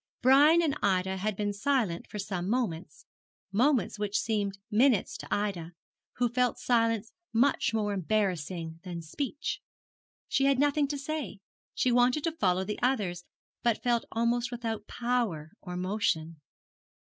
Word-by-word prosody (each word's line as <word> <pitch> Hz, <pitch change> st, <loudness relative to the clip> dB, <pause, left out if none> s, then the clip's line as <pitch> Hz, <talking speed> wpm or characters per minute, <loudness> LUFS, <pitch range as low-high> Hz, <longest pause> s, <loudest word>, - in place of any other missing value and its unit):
Brian 295 Hz, +6 st, +6 dB
and 300 Hz, -3 st, +1 dB
Ida 190 Hz, -1 st, +1 dB
had 210 Hz, +2 st, -1 dB
been 205 Hz, +1 st, -1 dB
silent 210 Hz, -5 st, 0 dB
for -, -, -6 dB
some 190 Hz, -2 st, -3 dB
moments 230 Hz, -, -2 dB, 0.5 s
moments 235 Hz, -2 st, +2 dB
which 205 Hz, -1 st, 0 dB
seemed 205 Hz, -3 st, -1 dB
minutes 230 Hz, -1 st, +3 dB
to -, -, -9 dB
Ida, 185 Hz, -5 st, -2 dB, 0.4 s
who 245 Hz, 0 st, +1 dB
felt 250 Hz, +1 st, +1 dB
silence 230 Hz, -2 st, +1 dB, 0.2 s
much 245 Hz, +5 st, +2 dB
more 210 Hz, -2 st, 0 dB
embarrassing 180 Hz, -4 st, -1 dB
than 175 Hz, -2 st, -6 dB
speech. 280 Hz, -, -4 dB, 0.7 s
She 270 Hz, -, +2 dB
had 275 Hz, -1 st, +4 dB
nothing 290 Hz, +1 st, +2 dB
to 285 Hz, +1 st, -3 dB
say 285 Hz, -6 st, -4 dB, 0.4 s
she 255 Hz, -, +2 dB
wanted 245 Hz, +4 st, +3 dB
to 330 Hz, -, +1 dB
follow 185 Hz, -, +1 dB
the 210 Hz, +2 st, -4 dB
others, 205 Hz, -9 st, 0 dB, 0.4 s
but 235 Hz, -2 st, +1 dB
felt 240 Hz, -1 st, +1 dB
almost 235 Hz, +1 st, +1 dB
without 230 Hz, -3 st, -4 dB
power 235 Hz, -11 st, -1 dB
or 180 Hz, -1 st, -6 dB
motion. 180 Hz, -4 st, -1 dB
220 Hz, 145 wpm, -29 LUFS, 190-250 Hz, 0.7 s, Brian